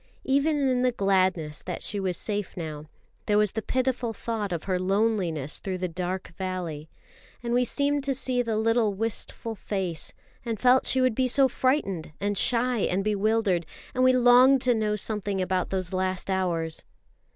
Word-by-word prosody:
Even 280 +1 +2
in 250 -1 +1
the 250 0 +3
gladness 185 -7 0
that 180 - -5
she 205 - -1
was 185 -2 -1
safe 205 -3 -3
now, 155 -3 -5 0.4
there 210 - +3
was 210 -2 +3
the 220 - -3
pitiful 255 0 -1
thought 215 -3 -3
of 170 -3 -3
her 185 -2 -1
loneliness 185 -7 0
through 190 -2 -4
the 185 0 -2
dark 180 +2 -4
valley; 175 -5 -4 0.5
and 235 0 -2
we 250 +1 +3
seemed 285 +3 0
to 275 -1 -1
see 255 -1 0
the 225 -3 -1
little 225 -2 +2
wistful 225 +1 -3
face, 190 -5 -4 0.3
and 230 -3 -3
felt 255 +1 +4
she 260 - +3
would 255 -2 +3
be 255 +3 +1
so 270 +2 +5
frightened 215 - -1
and 205 +1 -1
shy 245 +3 +1
and 195 0 0
bewildered; 210 -3 +1 0.3
and 255 - +1
we 255 - +6
longed 255 +2 +6
to 250 - +4
know 215 -2 0
something 205 -1 -2
about 185 0 -1
those 185 -1 -3
last 185 0 -1
hours. 170 -4 -1
210 Hz, 175 wpm, -26 LUFS, 185-245 Hz, 0.5 s, we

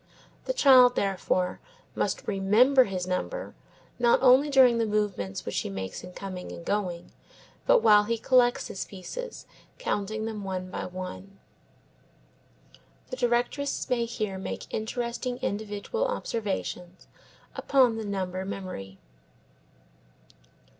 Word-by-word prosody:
The - - -1
child, 255 - +7
therefore, 185 -2 0 0.3
must - - -2
remember 220 +7 +4
his 185 -3 -3
number 185 - -3 0.5
not 240 -1 +5
only 265 +3 +6
during 255 -4 +5
the 225 - +1
movements 205 - -2
which 105 - -1
he - - -4
makes 95 -1 -6
in 180 - -9
coming 185 -2 -7
and 170 - -9
going, 180 -4 -2 0.6
but - - +5
while 210 -1 +6
he 230 +2 -1
collects 245 +1 +3
his 195 - -5
pieces, 455 - -8 0.3
counting 215 - -2
them 220 -2 -5
one 185 -1 -4
by - - -4
one. 185 +2 -8 1.7
The - - -2
directress 245 +3 0
may 235 -2 +2
here 215 -4 -4
make - - -6
interesting 240 +2 -3
individual 215 - -2
observations 195 - -4 0.5
upon 255 -5 +3
the 220 - -4
number 190 -2 -3
memory. 185 - -7
210 Hz, 120 wpm, -27 LUFS, 185-245 Hz, 1.7 s, child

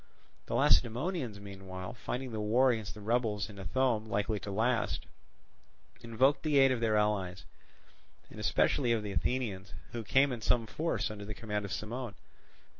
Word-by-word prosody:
The - - -2
Lacedaemonians, 120 - +2
meanwhile, 95 0 -7
finding 125 +1 -4
the 110 - -3
war 120 +5 +4
against 110 -4 -3
the 105 - -10
rebels 110 -1 0
in 100 - -11
Ithome 115 +1 0
likely 105 0 0
to 100 - -7
last, 115 +4 0 0.9
invoked 125 +5 +2
the 150 -2 +2
aid 135 -1 +6
of 125 - 0
their 110 -2 +2
allies, 95 -4 0 0.9
and - - -10
especially 125 -5 +2
of 110 -2 0
the 105 - -4
Athenians, 105 -3 -2 0.2
who 115 -1 -4
came 135 +6 +4
in 120 -3 -4
some 115 +1 +2
force 155 0 -1
under 105 -1 -7
the 105 +1 -6
command 105 -2 -3
of 100 - -7
Cimon. 120 +1 -4
110 Hz, 165 wpm, -32 LUFS, 105-125 Hz, 0.9 s, aid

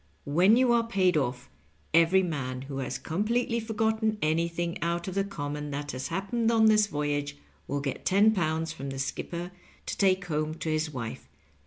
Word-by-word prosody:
When 180 +10 +5
you 255 -1 +4
are 230 -1 +2
paid 190 -6 +2
off, 125 -4 -1 0.5
every 170 +4 +5
man 130 -6 -3
who 135 0 -5
has 135 - -3
completely 230 +7 0
forgotten 220 -1 0
anything 170 +1 -1
out 170 +1 -1
of 190 - -3
the 195 +1 +1
common 150 -6 -5
that 145 +1 -4
has 130 +1 -4
happened 225 +4 -1
on 225 -1 +4
this 215 -1 +5
voyage 145 -3 -2 0.3
will 140 0 -2
get 135 -2 -4
£10 175 -6 +2
from 140 -3 -6
the 135 - -5
skipper 170 +6 -4 0.3
to - - -3
take 190 -1 +3
home 155 -1 -2
to 165 - -4
his 155 0 0
wife. 115 - -6
170 Hz, 175 wpm, -28 LUFS, 145-200 Hz, 0.5 s, When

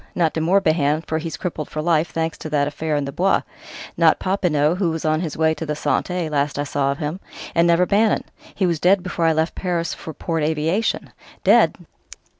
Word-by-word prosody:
Not 165 -3 +1
De 160 - -2
Morbihan, 160 -4 +2
for 160 - -1
he's 160 -3 -5
crippled 160 -4 -4
for 155 - -5
life, 160 0 +1
thanks 160 -1 -2
to 155 - -6
that 145 -1 +1
affair 150 +1 -2
in 145 -1 0
the 140 - -5
Bois; 190 +7 +1 0.5
not - - +4
Popinot, 175 -4 +1
who 180 -4 +2
was 160 0 -4
on 155 +1 +1
his 160 -4 -4
way 160 0 +3
to 160 - -6
the 150 -1 -3
Santé, 180 +3 -1
last 145 -1 -1
I 145 - 0
saw 140 -1 0
of 140 - -4
him; 155 +5 -4 0.3
and 170 0 +3
never 170 +1 +4
Bannon 210 +3 +2 0.3
he 195 - +1
was 170 -3 0
dead 185 +2 +3
before 175 -2 -2
I 165 - +4
left 160 +1 0
Paris 170 -2 -2
for 160 - -8
Port 165 -2 -2
Aviation." 160 +8 0 0.3
"Dead!" - - +5
160 Hz, 215 wpm, -21 LUFS, 150-175 Hz, 0.5 s, Dead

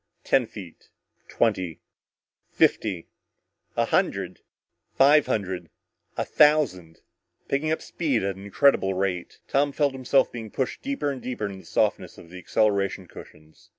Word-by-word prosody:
Ten 130 -4 +2
feet 95 -7 -12 0.4
twenty 95 -8 0 0.7
fifty 95 -6 +1 0.7
a - - +3
hundred - - 0 0.6
five 145 +2 +5
hundred 95 -5 -2 0.5
a - - -1
thousand 140 - +2 0.5
picking 150 +3 0
up 160 - -1
speed 140 - -1
at 100 -1 -1
an 95 - -11
incredible 100 -2 +3
rate. 95 -2 -2
Tom 145 +1 +1
felt 140 -1 +1
himself 130 +1 +2
being 115 -2 -7
pushed 130 +4 -3
deeper 270 - -2
and 130 -2 -6
deeper 125 -4 -4
into 100 -1 -6
the 95 - -16
softness - - -1
of 85 - -14
the 90 - -9
acceleration 100 -1 0
cushions. 75 -2 -15
110 Hz, 140 wpm, -25 LUFS, 95-140 Hz, 0.7 s, five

